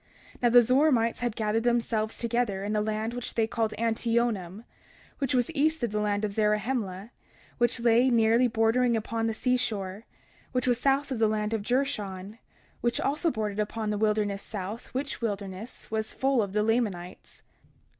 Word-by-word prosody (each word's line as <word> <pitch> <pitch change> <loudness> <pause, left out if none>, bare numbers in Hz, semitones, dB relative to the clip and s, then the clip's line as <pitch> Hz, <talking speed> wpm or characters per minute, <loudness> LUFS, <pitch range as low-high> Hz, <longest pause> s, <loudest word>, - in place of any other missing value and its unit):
31:3 - - -32
Now 240 - +4
the 245 +1 +8
Zoramites 250 -2 +3
had 240 -3 -2
gathered 215 0 0
themselves 230 -2 0
together 235 -4 -1
in 210 +1 -2
a 210 - +2
land 215 +2 -2
which 245 0 -5
they 225 - +3
called 225 -1 -2
Antionum, 230 -4 0 0.6
which 270 -2 0
was 245 +4 +1
east 315 -1 +1
of 235 - 0
the 210 - -1
land 210 0 0
of 205 - -3
Zarahemla, 210 -1 -1 0.5
which 240 0 +2
lay 235 +2 +4
nearly 230 +1 +4
bordering 230 +1 +2
upon 225 +1 -2
the 225 - -2
seashore, 220 -5 -1 0.5
which 250 0 0
was 245 -1 +2
south 275 +2 +1
of 250 - -2
the 220 - +4
land 215 0 -1
of 220 - 0
Jershon, 210 -5 -2 0.4
which 240 0 0
also 300 +5 +1
bordered 215 -6 -3
upon 215 0 -2
the 210 - -1
wilderness 210 -2 +1
south, 210 +2 -6
which 270 0 -4
wilderness 205 0 -5
was 220 0 -2
full 265 -2 +2
of 200 -2 -3
the 210 0 +2
Lamanites. 210 -6 -2
225 Hz, 175 wpm, -28 LUFS, 210-245 Hz, 0.6 s, the